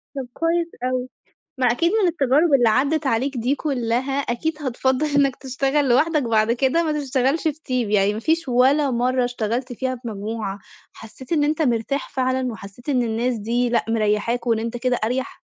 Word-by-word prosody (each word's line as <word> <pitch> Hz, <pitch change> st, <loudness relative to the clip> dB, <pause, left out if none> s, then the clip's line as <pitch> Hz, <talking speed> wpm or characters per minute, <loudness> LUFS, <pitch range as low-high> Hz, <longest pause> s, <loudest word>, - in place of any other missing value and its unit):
طَب 265 Hz, -2 st, -4 dB
كويس 335 Hz, +1 st, 0 dB, 0.2 s
أوي، 255 Hz, 0 st, -1 dB, 0.5 s
ما 255 Hz, -, +2 dB
أكيد 335 Hz, +9 st, +2 dB
من 425 Hz, -4 st, +3 dB
التجارب 295 Hz, 0 st, +2 dB
اللي 240 Hz, -4 st, +5 dB
عدِّت 280 Hz, +6 st, +1 dB
عليك 265 Hz, +3 st, 0 dB
دي 245 Hz, +4 st, +1 dB
كلّها 260 Hz, -3 st, -1 dB
أكيد 290 Hz, +5 st, -2 dB
هتفضّل 260 Hz, +2 st, 0 dB
إنك 280 Hz, -3 st, +2 dB
تشتغل 270 Hz, +2 st, 0 dB
لوحدك 300 Hz, +4 st, +3 dB
بعد 225 Hz, -1 st, +2 dB
كده 265 Hz, +7 st, +2 dB
ما 310 Hz, -, 0 dB
تشتغلش 270 Hz, +2 st, 0 dB
في 305 Hz, -, 0 dB, 0.2 s
team، 250 Hz, -4 st, 0 dB
يعني 200 Hz, 0 st, +3 dB
ما 220 Hz, -, -4 dB
فيش 325 Hz, +2 st, 0 dB
ولا 265 Hz, +4 st, +3 dB
مَرّة 250 Hz, +1 st, +1 dB
اشتغلت 245 Hz, +1 st, -2 dB
فيها 255 Hz, +2 st, -2 dB
في 240 Hz, -1 st, -8 dB
مجموعة 210 Hz, -1 st, -4 dB, 0.3 s
حسّيت 245 Hz, +6 st, -11 dB
إن 295 Hz, -3 st, +3 dB
أنت 305 Hz, +2 st, 0 dB
مرتاح 255 Hz, +1 st, -1 dB
فعلًا 260 Hz, -2 st, -1 dB
وحسّيت 215 Hz, +5 st, -12 dB
إن 255 Hz, -4 st, +2 dB
الناس 235 Hz, +2 st, -1 dB
دي 240 Hz, +3 st, 0 dB
لأ 235 Hz, -, +1 dB
مريّحاك 225 Hz, +2 st, 0 dB
وإن 230 Hz, -2 st, +2 dB
أنت 230 Hz, +2 st, -3 dB
كده 250 Hz, +1 st, 0 dB
أريح؟ 250 Hz, +4 st, -3 dB
255 Hz, 180 wpm, -22 LUFS, 235-280 Hz, 0.5 s, اللي